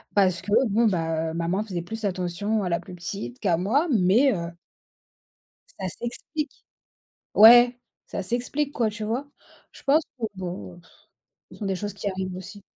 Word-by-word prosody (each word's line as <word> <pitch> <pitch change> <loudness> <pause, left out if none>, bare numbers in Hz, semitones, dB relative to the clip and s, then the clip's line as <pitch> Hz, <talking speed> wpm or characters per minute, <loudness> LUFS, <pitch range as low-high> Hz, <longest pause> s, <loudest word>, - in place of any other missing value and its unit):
parce 185 -4 +3
que 205 - -7 0.2
bon, 225 +3 +3
bah 165 -3 0
heu, - - -7
maman 170 +5 -1
faisait 185 -5 -4
plus 220 +6 -7
attention 195 +3 -1
à 180 - -1
la 170 - +1
plus 180 -2 -10
petite 170 -8 -6
qu'à 175 -5 +2
moi, 255 - +1
mais 230 +5 +4
heu 170 -2 -4 1.3
ça 190 - -2
s'explique. 245 - -6 0.7
Ouais, 240 +3 +8 0.3
ça - - -4
s'explique, 250 +7 -2
quoi, 230 -2 +1
tu 215 0 -6
vois? 245 +7 -2 0.4
Je - - -15
pense 295 +4 +4 0.2
que, 230 - -3
bon, 175 - -6
heu, - - -15
pff, - - -23 0.6
ce - - -11
sont 205 - -4
des 190 -1 0
choses 205 +2 -4
qui 200 0 -3
arrivent 185 -1 -4
aussi. 190 +2 -9
200 Hz, 180 wpm, -25 LUFS, 180-230 Hz, 1.3 s, Ouais